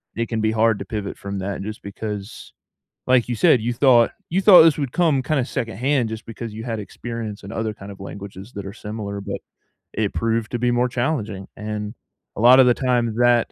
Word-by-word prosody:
It 115 +1 -1
can 115 -2 -1
be 110 0 +2
hard 110 -1 +2
to - - -6
pivot 105 -3 -5
from 100 0 -5
that 95 +1 -4
just 105 +2 -6
because, 105 0 -7 0.5
like 125 -2 +3
you 120 - -1
said, 135 -4 +5
you 120 +1 -1
thought 120 -2 +4 0.2
you 185 +4 +2
thought 185 -4 +9
this 160 -3 +5
would 140 -4 -2
come 160 -7 +2
kinda 140 0 0
secondhand 120 +2 -1
just 110 +1 -7
because 115 0 -7
you 110 - -6
had 115 -2 -3
experience 110 0 -6
in 100 - -8
other 110 -1 -2
kind 100 +1 -10
of 100 - -13
languages 100 +2 -9
that 100 -1 -7
are 95 - -6
similar, 105 -2 -6
but - - -5 0.5
it 105 -2 -1
proved 115 -1 -1
to 120 - -1
be 120 0 +2
more 120 +1 +2
challenging, 120 -7 -2
and 105 0 -4 0.4
a - - -2
lotta 130 +3 +8
the 125 -1 +5
time 120 -3 0
that 120 -1 +3
115 Hz, 215 wpm, -22 LUFS, 105-125 Hz, 0.5 s, thought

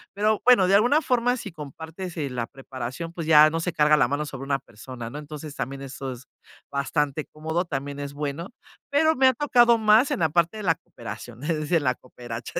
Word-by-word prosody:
pero 215 +1 +1
bueno, 240 -8 +6
de 195 - +3
alguna 245 +10 +4
forma 245 0 +1
si - - -7
compartes, 160 +4 -8
eh, 140 -4 -2
la 120 -2 -3
preparación, 135 +5 -7
pues 165 -2 -5
ya 155 -1 +7
no 165 - -1
se 180 +2 -2
carga 150 -1 +4
la 140 - +3
mano 145 +3 -2
sobre 135 -2 -7
una 140 0 +1
persona, 120 0 -9
¿no?, 145 - -6
entonces, 150 0 -8
también 135 +2 -5
eso 135 0 -6
es 125 0 -9 0.5
bastante 140 +1 -1
cómodo, 160 +3 -3
también 140 -2 -4
es 140 0 -5
bueno, 145 +4 -4 0.4
pero 315 +3 +3
me 265 0 +5
ha 260 - +5
tocado 240 -4 +4
más 220 +5 +5
en 285 - -2
la 160 - +3
parte 170 +5 +1
de 215 - -6
la 165 -4 +3
cooperación, 120 -2 -10
es 165 +1 0
decir, 155 +2 +1
la 130 -1 +2
coperacha. 120 -2 -7
155 Hz, 215 wpm, -25 LUFS, 135-190 Hz, 0.5 s, ya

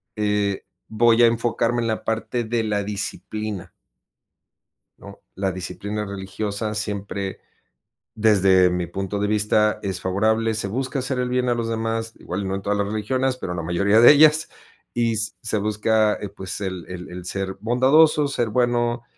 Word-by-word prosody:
eh, 105 -2 -1 0.2
voy 115 +1 +4
a - - +8
enfocarme 115 +1 0
en 115 - -1
la 110 -1 -2
parte 115 +2 -2
de 115 0 -1
la 105 -2 -1
disciplina 105 -1 -4 1.3
¿no? - - -12 0.2
La 95 0 -1
disciplina 100 +3 -5
religiosa 100 +2 -4
siempre, 100 -2 -4 0.8
desde 95 -4 +4
mi 90 -1 -2
punto 95 +3 -4
de 105 - 0
vista, 105 0 +2
es 95 -2 -3
favorable, 110 +4 +1
se 105 -2 -2
busca 130 +6 -2
hacer 130 0 -2
el 125 0 -1
bien 125 0 0
a - - +3
los 115 -1 -2
demás, 115 0 -2
igual 90 +3 -5
y - - -4
no 95 0 -2
en 95 - -4
todas 105 +1 -1
las 100 -1 0
religiones, 125 +5 -1
pero 90 -8 -5
la 85 -1 -4
mayoría 100 +6 +2
de 120 - +9
ellas, 155 +1 +5 0.4
y 115 -1 +1
se 110 0 -1
busca, 110 +1 +2
eh, 105 - -6
pues, 95 +2 -6
el 95 -3 -4
el 90 -1 -8
el 90 0 -8
ser 95 +1 -3
bondadoso, 140 +6 +4
ser 120 -4 -1
bueno, 120 0 0
105 Hz, 170 wpm, -22 LUFS, 100-115 Hz, 1.3 s, de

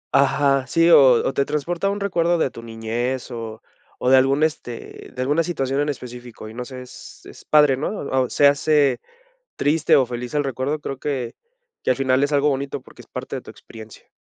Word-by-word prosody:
Ajá, 140 -1 +3
sí, 165 +4 +3
o 135 -5 +8
o - - -1
te 140 - +2
transporta 165 +6 -2
a - - +2
un 200 - -2
recuerdo 175 -4 +1
de 135 - 0
tu 115 - -10
niñez 115 +3 -4
o 115 -1 -7 0.3
o 125 - 0
de 130 - +8
algún, 135 +3 +3
este, 150 -7 -4
de 125 - -4
alguna 145 +5 +2
situación 135 -5 -2
en 145 - -1
específico 125 -4 -8
y 110 - -10
no 125 +1 -6
sé, 130 -1 -8
es 125 - -13
es - - -14
padre, 150 -3 +4
¿no? 145 - -2
O 130 - -1
se 145 - +3
hace 140 -2 +2 0.5
triste 155 +2 +2
o 135 - +4
feliz 120 +1 -6
el 145 -1 +1
recuerdo, 135 +3 -2
creo 135 - -5
que 130 -5 -3 0.5
que - - +1
al 125 - +1
final 130 0 +1
es 145 - -4
algo 145 +1 +3
bonito 140 0 -3
porque - - -16
es - - -22
parte - - -6
de - - -7
tu - - -11
experiencia. 110 -1 -14
135 Hz, 215 wpm, -22 LUFS, 125-150 Hz, 0.5 s, o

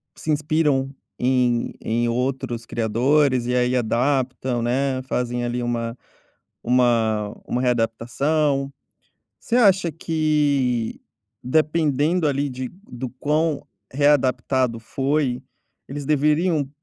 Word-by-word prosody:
se 155 - -3
inspiram 150 -3 +1 0.3
em 125 -2 +1
em 120 +1 0
outros 125 -1 -2
criadores 125 +4 +1
e 125 - -1
aí 125 0 +2
adaptam, 125 +1 0
né. 130 +2 0
Fazem 125 -1 -2
ali 120 0 -2
uma 120 0 -2 0.6
uma 115 -4 +2 0.2
uma 125 - -1
readaptação. 135 +4 0 0.7
Você 235 - -1
acha 195 -7 +4
que, 145 -7 0 0.4
dependendo 155 +3 +1
ali 140 0 0
de 130 -1 -5 0.2
do 125 +1 -5
quão 150 -1 0 0.3
readaptado 130 -3 +2
foi, 135 +1 -1 0.5
eles 145 +1 -5
deveriam, 150 +3 +2
hu 135 - -8
130 Hz, 105 wpm, -22 LUFS, 120-150 Hz, 0.7 s, acha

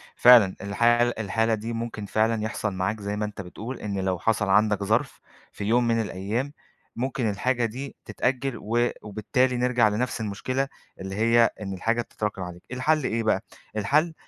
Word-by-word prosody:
فعلًا، 120 -6 +7
الحالة 120 +4 +3
الحالة 110 +2 +1
دي 110 +2 -3
ممكن 115 -2 -4
فعلًا 110 +2 +1
يحصل 110 -2 -2
معاك، 95 +4 -1
زي 100 +1 -3
ما 105 0 -1
أنتَ 105 -1 -6
بتقول، 110 +7 -7
إن 100 -2 -3
لو 95 -2 -1
حصل 105 0 +1
عندك 105 +1 +3
ظرف 110 +7 0 0.3
في - - -7
يوم 120 +3 +2
من 115 -1 +2
الأيَّام، 110 +7 -3 0.4
ممكن 130 -1 -1
الحاجة 120 +4 0
دي 130 +5 -6
تتأجَّل، 130 0 -1
و 120 +3 +1
وبالتالي 125 +5 0
نرجع 125 -2 +3
لنفس 115 +3 -2
المشكلة، 130 +6 -2 0.3
اللي 95 +1 -5
هي 115 +2 +4
إن 95 -2 -4
الحاجة 115 +5 0
بتتراكم 105 -3 -4
عليك. 90 -1 -7
الحل 150 +4 +1
إيه 115 -1 0
بقى، 110 -3 +1 0.3
الحل 150 +11 +2
115 Hz, 170 wpm, -26 LUFS, 105-120 Hz, 0.4 s, فعلًا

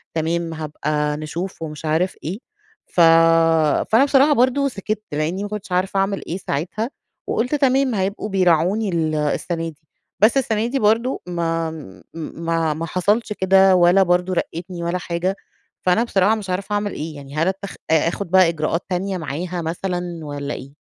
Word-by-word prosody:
"تمام 165 +1 -1
هابقى 150 -1 -2
نشوف" 165 +4 -5
ومش 155 0 -6
عارف 165 +4 +1
إيه. 185 +8 -4 0.5
ف 175 - +1 0.9
فأنا 245 +6 +6
بصراحة 285 +1 +4
برضه 260 +2 +2
سِكِت 215 -1 -4
لإنّي 160 +7 -1
ما 205 - -4
كنتش 210 -3 -6
عارفة 185 +2 0
أعمل 195 0 -1
إيه 175 - -3
ساعتها 190 - -3 0.4
وقُلت 250 +6 0
تمام 270 -3 +2
هيبقوا 200 +2 -2
بيراعوني 190 +3 +2
ال 160 -3 0
السَنة 165 +2 -1
دي. 150 -1 -16 0.4
بس 225 +6 +5
السَنة 225 -3 +1
دي 270 +2 -1
برضه 225 +5 +1
ما 165 -2 -1
م 145 -12 -11
ما 165 -1 -2
ما 165 +2 -4
حصلش 210 +6 0
كده 190 0 +5
ولا 180 +2 +5
برضه 180 +1 +1
رقّتني 170 0 -4
ولا 170 +2 -1
حاجة. 180 +2 -2 0.5
فأنا 185 +6 +3
بصراحة 205 -1 +2
مش 200 -3 -7
عارفة 195 +3 -2
أعمل 205 0 0
إيه؟ 155 0 -5
يعني 140 0 -10
هل 165 +3 +1
اتخ 195 +1 -3 0.2
أ 160 0 +4
آخُد 180 +1 -3
بقى 185 -3 +6
إجراءات 165 +1 -2
تانية 190 +1 -1
معاها 170 +3 -4
مثلًا 175 +1 -3
والّا 145 0 -4
إيه؟ 135 +2 -9
180 Hz, 165 wpm, -21 LUFS, 165-205 Hz, 0.9 s, فأنا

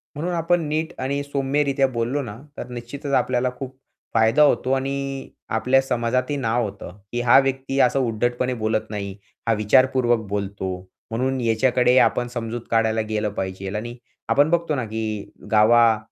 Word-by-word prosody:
म्हणून 170 +5 -2
आपण 170 +1 +1
नीट 155 +2 -2
आणि 140 +2 -1
सौम्यरित्या 140 0 +1
बोललो 125 +3 -1
ना 105 -5 -7 0.2
तर - - -6
निश्चितच 135 +4 -6
आपल्याला 125 -1 +2
खूप 130 0 -7 0.4
फायदा 115 +6 +4
होतो. 135 -3 +2
आणि 135 0 -2 0.2
आपल्या 125 +4 +3
समाजात 125 -1 0
ही 145 - 0
नाव 120 -2 0
होतं, 100 -3 -7
की 120 - -1
हा 120 -1 +6
व्यक्ती 135 0 -1
असं 135 +1 +4
उद्धटपणे 120 +1 0
बोलत 110 -2 0
नाही, 100 -2 -5 0.3
हा 115 - +4
विचारपूर्वक 120 +2 +3
बोलतो. 100 -1 -3 0.4
म्हणून 130 +3 -1
याच्याकडे 125 +2 +3
आपण 120 - +2
समजूत 120 -1 -4
काढायला 110 -1 +2
गेलं 105 -1 -1
पाहिजे. 95 0 -4
आणि 120 +3 -4 0.3
आपण 145 +2 +4
बघतो 170 -2 +1
ना, 130 -4 -2
की 110 -1 -4 0.2
गावा 110 +1 +5
125 Hz, 155 wpm, -23 LUFS, 110-135 Hz, 0.4 s, हा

